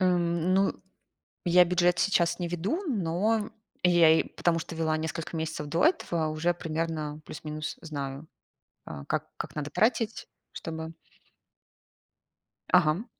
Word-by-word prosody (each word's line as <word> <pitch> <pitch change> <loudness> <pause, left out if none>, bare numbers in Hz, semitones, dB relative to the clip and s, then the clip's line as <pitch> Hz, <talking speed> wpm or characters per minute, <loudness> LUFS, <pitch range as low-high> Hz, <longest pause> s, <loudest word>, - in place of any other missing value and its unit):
Эм, 175 -1 +2
ну, 195 +1 +3 0.7
я 180 0 +6
бюджет 175 0 +2
сейчас 170 -3 +2
не 175 - -1
веду, 180 - -2
но 210 - 0 0.3
я 175 -2 +6
я 160 - +6
и - - -6
потому 165 -1 0
что 165 - -7
вела 160 -1 +1
несколько 160 +1 -4
месяцев 155 -2 -3
до 165 - +2
этого, 170 - +1
уже 155 +3 0
примерно 160 -3 -3
плюс-минус 155 0 -6
знаю, 145 -2 -5 0.6
а, 70 -2 -8
как - - -2
как - - -6
надо 150 -1 -3
тратить, 225 -1 +1 0.3
чтобы 160 0 -6 1.8
Ага. 180 +3 +4
170 Hz, 130 wpm, -28 LUFS, 155-180 Hz, 1.8 s, я